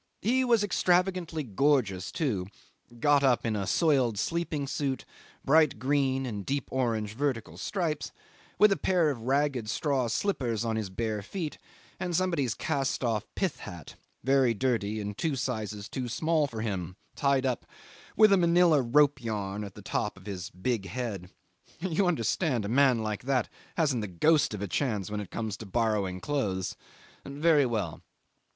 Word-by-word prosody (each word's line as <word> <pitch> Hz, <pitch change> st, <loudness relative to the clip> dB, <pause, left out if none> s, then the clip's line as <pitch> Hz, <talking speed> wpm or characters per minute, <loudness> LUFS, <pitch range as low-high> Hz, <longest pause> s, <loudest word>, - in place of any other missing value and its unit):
He 255 Hz, +4 st, +3 dB
was 235 Hz, -4 st, +3 dB
extravagantly 180 Hz, -4 st, +1 dB
gorgeous 110 Hz, -6 st, +1 dB
too 105 Hz, -, -1 dB, 0.5 s
got 145 Hz, +2 st, +4 dB
up 130 Hz, -3 st, +3 dB
in 110 Hz, -2 st, 0 dB
a 100 Hz, -2 st, -2 dB
soiled 135 Hz, -, +2 dB
sleeping 165 Hz, +2 st, -1 dB
suit, 135 Hz, -1 st, -2 dB, 0.4 s
bright 155 Hz, -2 st, +4 dB
green 135 Hz, +1 st, +1 dB
and 105 Hz, -5 st, -4 dB
deep 140 Hz, +7 st, -2 dB
orange 115 Hz, -5 st, -1 dB
vertical 130 Hz, -3 st, -2 dB
stripes, 165 Hz, -6 st, -2 dB, 0.5 s
with 210 Hz, -1 st, +6 dB
a 195 Hz, -, +2 dB
pair 175 Hz, -5 st, +2 dB
of 120 Hz, -5 st, -6 dB
ragged 135 Hz, -2 st, 0 dB
straw 135 Hz, -1 st, 0 dB
slippers 120 Hz, -, -1 dB
on 115 Hz, -1 st, 0 dB
his 110 Hz, -3 st, -2 dB
bare 110 Hz, +2 st, -2 dB
feet, 155 Hz, -, -5 dB, 0.4 s
and 180 Hz, -2 st, -2 dB
somebody's 165 Hz, -10 st, +1 dB
cast 140 Hz, -4 st, -1 dB
off 110 Hz, -3 st, 0 dB
pith 190 Hz, -6 st, -1 dB
hat, 85 Hz, -5 st, -9 dB, 0.3 s
very 130 Hz, -3 st, +3 dB
dirty 110 Hz, -3 st, 0 dB
and 105 Hz, 0 st, -5 dB
two 160 Hz, -4 st, 0 dB
sizes 110 Hz, -5 st, -3 dB
too 130 Hz, -2 st, -4 dB
small 155 Hz, +4 st, +1 dB
for 115 Hz, -5 st, -6 dB
him, 90 Hz, -5 st, -3 dB, 0.2 s
tied 140 Hz, -2 st, +2 dB
up 125 Hz, -2 st, -1 dB, 0.5 s
with 215 Hz, -2 st, +7 dB
a -, -, +6 dB
manilla 170 Hz, -3 st, +5 dB
rope 140 Hz, +2 st, +3 dB
yarn 105 Hz, -2 st, -3 dB
on 100 Hz, -, -5 dB
the 105 Hz, -, -11 dB
top 105 Hz, +1 st, -2 dB
of 95 Hz, -, -15 dB
his 95 Hz, -4 st, -5 dB
big 95 Hz, +2 st, -2 dB
head. 100 Hz, -4 st, -4 dB, 0.5 s
You 180 Hz, +2 st, +1 dB
understand 135 Hz, -, 0 dB
a -, -, -3 dB
man 125 Hz, -2 st, +4 dB
like 110 Hz, +2 st, -3 dB
that 130 Hz, -3 st, +1 dB, 0.3 s
hasn't 140 Hz, -8 st, +2 dB
the 105 Hz, -, -3 dB
ghost 140 Hz, -, +2 dB
of 105 Hz, -, -5 dB
a -, -, -2 dB
chance 105 Hz, -3 st, -1 dB
when 105 Hz, -, -2 dB
it 100 Hz, -4 st, -6 dB
comes 110 Hz, -2 st, -4 dB
to 110 Hz, -, -9 dB
borrowing 100 Hz, -4 st, 0 dB
clothes. 100 Hz, -11 st, -1 dB, 0.5 s
Very 145 Hz, 0 st, +3 dB
well. 105 Hz, -9 st, -3 dB
130 Hz, 165 wpm, -29 LUFS, 105-150 Hz, 0.5 s, with